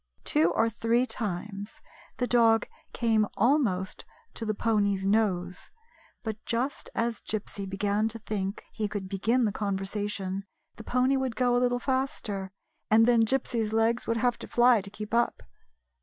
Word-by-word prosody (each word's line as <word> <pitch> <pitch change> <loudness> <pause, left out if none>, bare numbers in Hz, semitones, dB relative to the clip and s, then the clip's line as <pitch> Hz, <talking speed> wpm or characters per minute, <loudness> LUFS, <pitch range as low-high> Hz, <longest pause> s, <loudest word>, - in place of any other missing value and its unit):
Two 160 +3 +3
or 225 - +3
three 230 +2 +1
times 205 -2 -5 0.4
the 250 - +1
dog 230 -2 +4 0.2
came 220 -3 +2
almost 220 -7 +1 0.3
to 225 - -4
the 215 - 0
pony's 200 -3 +1
nose, 190 -4 0 0.5
but 220 -2 -5
just 245 +5 -2
as 230 -1 -1
Gypsy 205 -2 -4
began 205 +2 0
to 225 +1 -4
think 205 -2 -4
he 215 -2 -2
could 205 -2 -5
begin 225 +6 +1
the 210 - +1
conversation 195 -1 -3 0.3
the 225 - -9
pony 255 +4 +2
would 260 -3 -2
go 245 0 +2
a 245 - +3
little 245 0 +2
faster, 245 -7 -2 0.4
and 225 +1 +6
then 235 -1 +5
Gypsy's 230 -4 0
legs 225 +2 +1
would 230 - +1
have 240 +1 +1
to - - -8
fly 240 -2 +5
to 200 - -9
keep 210 +1 -8
up. 235 0 +1
220 Hz, 155 wpm, -28 LUFS, 200-235 Hz, 0.5 s, and